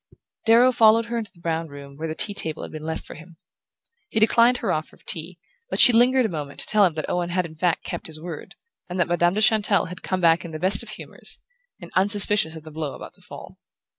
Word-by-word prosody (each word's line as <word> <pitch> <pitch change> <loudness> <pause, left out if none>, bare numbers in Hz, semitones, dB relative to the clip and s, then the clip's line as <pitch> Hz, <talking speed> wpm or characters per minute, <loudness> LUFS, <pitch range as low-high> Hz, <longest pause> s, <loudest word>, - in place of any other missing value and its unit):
Darrow 240 +3 +5
followed 225 -1 +4
her 235 +1 -4
into 220 - -7
the 175 - -23
brown 165 -1 -3
room, 140 -1 -12
where 160 +3 -5
the 160 - -5
tea 205 - -1
table 160 -5 -3
had - - -8
been 155 - -8
left 160 +1 -5
for - - -10
him. 165 +1 -15 0.7
He 220 - -1
declined 235 +3 +4
her 215 -6 -2
offer 155 0 -4
of - - -25
tea, 170 +2 -3 0.3
but - - -3
she 245 - +9
lingered 250 +2 +3
a - - -1
moment 150 -4 -7
to - - -1
tell 210 -2 +3
him 170 -4 -1
that 155 - -4
Owen 175 -1 -2
had 180 0 -1
in 160 - -10
fact 170 +1 -1
kept - - -6
his 155 -1 -6
word, 165 -2 -9 0.3
and 180 +1 -5
that 175 - +2
Madame 175 +1 +1
de 215 - 0
Chantelle 210 -4 +2
had 180 - -10
come 185 - -3
back 165 -1 +3
in 170 - -8
the 155 -1 -7
best 190 +4 +4
of 230 - -8
humours, 215 - -6 0.4
and 175 -3 -12
unsuspicious 200 -3 +5
of 160 - -10
the 155 - -12
blow 150 -2 -5
about - - -11
to - - -20
fall. - - -13
175 Hz, 255 wpm, -23 LUFS, 160-215 Hz, 0.7 s, she